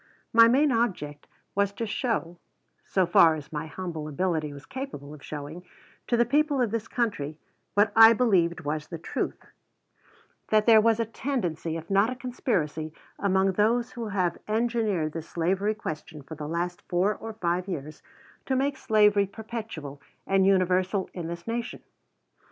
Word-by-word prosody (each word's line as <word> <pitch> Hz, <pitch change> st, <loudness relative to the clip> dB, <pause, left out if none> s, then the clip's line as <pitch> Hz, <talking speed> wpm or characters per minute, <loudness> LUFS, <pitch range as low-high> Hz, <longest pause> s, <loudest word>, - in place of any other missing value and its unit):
My 230 Hz, 0 st, +8 dB
main 275 Hz, +5 st, +4 dB
object 185 Hz, -, -1 dB, 0.3 s
was 200 Hz, 0 st, +1 dB
to 225 Hz, +3 st, -3 dB
show, 210 Hz, -7 st, -2 dB, 0.5 s
so 190 Hz, -2 st, +2 dB
far 165 Hz, -1 st, +6 dB
as 150 Hz, 0 st, -9 dB
my 155 Hz, +1 st, -3 dB
humble 160 Hz, -2 st, -5 dB
ability 155 Hz, 0 st, -1 dB
was 140 Hz, 0 st, -11 dB
capable 260 Hz, -, -7 dB
of 150 Hz, -, -12 dB
showing, 150 Hz, +4 st, -7 dB, 0.4 s
to 240 Hz, -, +2 dB
the 240 Hz, -, +4 dB
people 295 Hz, 0 st, +2 dB
of 240 Hz, -4 st, +1 dB
this 225 Hz, -1 st, -2 dB
country 200 Hz, -, -2 dB, 0.4 s
what 205 Hz, 0 st, +3 dB
I 225 Hz, 0 st, +9 dB
believed 190 Hz, -8 st, +2 dB
was 150 Hz, +1 st, -3 dB
the 165 Hz, -, -6 dB
truth, 160 Hz, -, -4 dB, 1.0 s
that 215 Hz, -1 st, +3 dB
there 225 Hz, -2 st, +7 dB
was 225 Hz, 0 st, +3 dB
a 230 Hz, -, +1 dB
tendency, 180 Hz, -, -3 dB
if 165 Hz, +3 st, -9 dB
not 200 Hz, +3 st, +4 dB
a 255 Hz, -, -4 dB
conspiracy, 185 Hz, -, -2 dB, 0.3 s
among 195 Hz, -1 st, +2 dB
those 230 Hz, +5 st, +1 dB
who 235 Hz, -2 st, -5 dB
have 185 Hz, -4 st, -1 dB
engineered 215 Hz, -7 st, 0 dB
this 165 Hz, 0 st, -7 dB
slavery 190 Hz, +5 st, 0 dB
question 155 Hz, -7 st, -7 dB
for 160 Hz, -, -9 dB
the 150 Hz, -1 st, -6 dB
last 175 Hz, +2 st, -3 dB
four 185 Hz, +4 st, +2 dB
or 225 Hz, +1 st, -8 dB
five 180 Hz, -3 st, -1 dB
years, 155 Hz, -4 st, -6 dB, 0.5 s
to 265 Hz, -, +1 dB
make 270 Hz, +1 st, 0 dB
slavery 210 Hz, -5 st, +3 dB
perpetual 210 Hz, -10 st, -7 dB, 0.2 s
and 195 Hz, 0 st, +3 dB
universal 185 Hz, 0 st, +2 dB
in 170 Hz, -3 st, -5 dB
this 170 Hz, 0 st, -6 dB
nation. 235 Hz, +1 st, -4 dB
195 Hz, 165 wpm, -27 LUFS, 165-230 Hz, 1.0 s, I